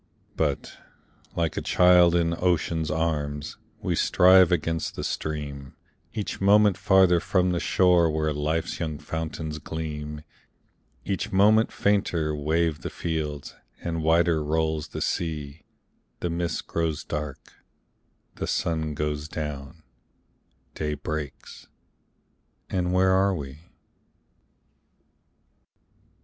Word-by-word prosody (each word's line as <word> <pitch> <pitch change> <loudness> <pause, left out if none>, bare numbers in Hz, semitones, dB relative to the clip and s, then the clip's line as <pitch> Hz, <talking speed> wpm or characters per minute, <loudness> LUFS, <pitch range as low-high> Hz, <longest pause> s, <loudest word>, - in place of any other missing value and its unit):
But, - - -2 0.6
like 85 -2 -1
a - - 0
child 90 -1 +5
in 85 -1 +2
ocean's 85 -3 0
arms, 75 -3 -2 0.3
We - - 0
strive 95 0 +5
against 80 -1 -1
the - - -5
stream, 70 -3 -4 0.4
Each 105 -2 -4
moment 100 0 +5
farther 95 -2 +4
from 90 +1 +1
the 85 - 0
shore 90 -3 +3
Where 80 0 0
life's 80 +3 -2
young 80 -3 -3
fountains 80 0 -5
gleam; 75 -1 -5 0.8
Each 95 - -2
moment 105 +3 +4
fainter 85 -6 +1
wave 80 +1 0
the - - -4
fields, 75 -4 -4 0.3
And 85 -1 -2
wider 80 0 +3
rolls 80 0 -1
the - - -6
sea; 75 -3 -3 0.5
The 85 - -2
mist 85 -1 -2
grows 80 -2 -2
dark, 75 -2 -6 0.8
the - - -3
sun 80 -2 -1
goes 75 0 -2
down, 75 +1 -6 0.9
Day 75 -1 -2
breaks, 75 -1 -6 1.0
and 90 -2 0
where 95 +1 +3
are 95 +1 +3
we? 70 -3 -7
80 Hz, 110 wpm, -26 LUFS, 75-90 Hz, 1.0 s, child